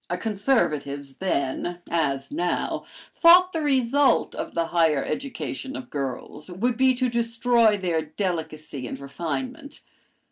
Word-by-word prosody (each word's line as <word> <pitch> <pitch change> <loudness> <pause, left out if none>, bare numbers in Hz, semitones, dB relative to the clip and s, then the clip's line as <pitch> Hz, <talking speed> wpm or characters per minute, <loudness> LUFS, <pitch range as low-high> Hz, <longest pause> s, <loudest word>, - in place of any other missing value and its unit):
"Conservatives 175 - -1
then, 175 -1 -1
as 140 -5 -1
now, 175 +4 -1 0.3
thought 360 +2 +6
the 325 - -1
result 275 -1 +2
of - - -6
the 170 0 +1
higher 160 -5 +2
education 270 +1 -5
of 265 -4 -8
girls 140 +3 -5
would 230 +7 -1
be 260 +1 +3
to 255 +1 +1
destroy 230 -2 +2
their 175 -4 0
delicacy 155 -5 -4
and 130 - -6
refinement. 250 - -5
185 Hz, 120 wpm, -25 LUFS, 150-255 Hz, 0.3 s, thought